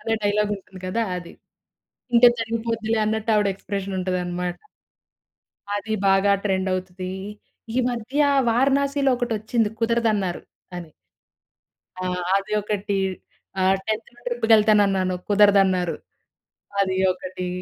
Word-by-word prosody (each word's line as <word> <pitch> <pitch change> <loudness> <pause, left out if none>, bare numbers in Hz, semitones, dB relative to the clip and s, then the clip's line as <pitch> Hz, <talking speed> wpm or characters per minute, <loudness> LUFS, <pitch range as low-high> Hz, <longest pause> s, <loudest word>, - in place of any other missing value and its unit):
అనే 225 0 -1
డైలాగ్ 205 0 +1
ఉంటుంది 190 -1 -14
కదా! 225 +5 -1
అది. 175 -1 -8 0.8
తింటె 240 0 +7
తరిగిపొద్దిలే 225 0 -2
అన్నట్టు 220 +1 -1
ఆవిడ 210 -1 +2
ఎక్స్ప్రెషన్ 195 0 -5
ఉంటది 185 0 -1
అన్నమాట. 175 0 -4 1.2
అది 220 +2 -3
బాగా 195 +1 +4
ట్రెండ్ 190 -1 0
అవుతది. 185 0 -5 0.6
ఈ - - +3
మధ్య 245 +4 -3 0.3
వారణాసిలో 275 +3 +2
ఒకటొచ్చింది 225 -2 -1
కుదరదన్నారు 225 -6 0 0.4
అని. 165 -3 -9 1.1
ఆ! - - -5 0.3
అది 195 +2 -3
ఒకటి. 205 -1 -2 0.6
ఆహ్, 190 +1 +4
10‌‌థ్‌న 220 +2 -4
ట్రిప్‌కెళ్తానన్నాను 210 -5 +3
కుదరదన్నారు. 195 -4 +4 0.9
అది 190 -1 0 0.2
ఒకటి. 185 0 -6
205 Hz, 105 wpm, -23 LUFS, 190-225 Hz, 1.2 s, తింటె